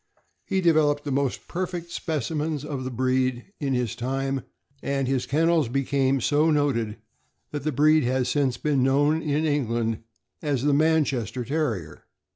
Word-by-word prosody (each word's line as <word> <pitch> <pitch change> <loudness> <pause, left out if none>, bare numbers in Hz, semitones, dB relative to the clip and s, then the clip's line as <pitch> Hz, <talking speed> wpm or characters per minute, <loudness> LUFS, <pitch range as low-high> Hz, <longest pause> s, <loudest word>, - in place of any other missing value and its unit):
He 190 -2 +1
developed 155 -4 +3
the 145 - -3
most 135 -1 -1
perfect 175 -1 -4
specimens 155 -1 -2
of 140 -4 -4
the - - -2
breed 130 - -1
in 135 -3 0
his 125 -4 -1
time, 135 +2 -2 0.4
and 135 -1 -1
his 130 -1 0
kennels 160 -2 +2
became 135 0 +1
so 150 +6 +3
noted 130 -8 +1 0.5
that 145 - -3
the 155 - 0
breed 155 +2 +4
has 130 0 +1
since 130 -2 +1
been 145 0 +1
known 145 +4 +3
in 150 +1 0
England 115 -6 0 0.4
as 145 -5 -1
the 145 0 +3
"Manchester 140 -6 +1
Terrier." 120 - -3
140 Hz, 150 wpm, -25 LUFS, 130-155 Hz, 0.5 s, breed